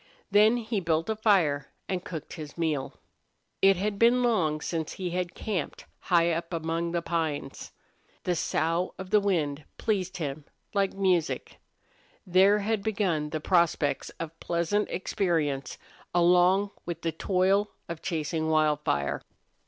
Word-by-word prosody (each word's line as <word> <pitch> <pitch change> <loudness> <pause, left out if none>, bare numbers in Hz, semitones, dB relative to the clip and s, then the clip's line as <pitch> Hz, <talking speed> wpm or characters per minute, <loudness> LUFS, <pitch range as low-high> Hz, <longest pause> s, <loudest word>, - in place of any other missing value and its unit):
Then 215 +3 +6
he 225 -2 -2
built 165 +1 0
a - - -1
fire 185 -10 +2 0.2
and 185 -2 -2
cooked 160 -3 -7
his 155 -2 -8
meal. 155 -5 -1 0.7
It 195 -1 +6
had 200 +1 -2
been 240 +2 +5
long 170 -11 +2
since 160 0 -3
he 180 -2 -4
had 180 0 -2
camped 190 -9 -4
high 170 -1 +3
up 165 +1 -3
among 165 +1 -2
the 170 -1 -1
pines. 155 -5 -3 0.5
The 180 - 0
sough 165 +2 0
of 190 0 -8
the 210 - +6
wind 155 -8 0
pleased 190 -4 -1
him, 145 -3 -4 0.3
like 195 -2 +1
music. 185 -4 0 0.7
There 190 +3 +5
had 210 0 -1
begun 190 -8 0
to 155 - -3
be - - -19
prospects 170 -5 +2
of 165 0 -6
pleasant 170 +5 0
experience 160 -8 -1 0.4
along 180 +3 +4
with 170 -1 -6
the 165 - 0
toil 195 +4 +1 0.2
of 170 -2 -6
chasing 160 -1 -2
Wildfire. 150 - +1
175 Hz, 145 wpm, -28 LUFS, 160-195 Hz, 0.7 s, Then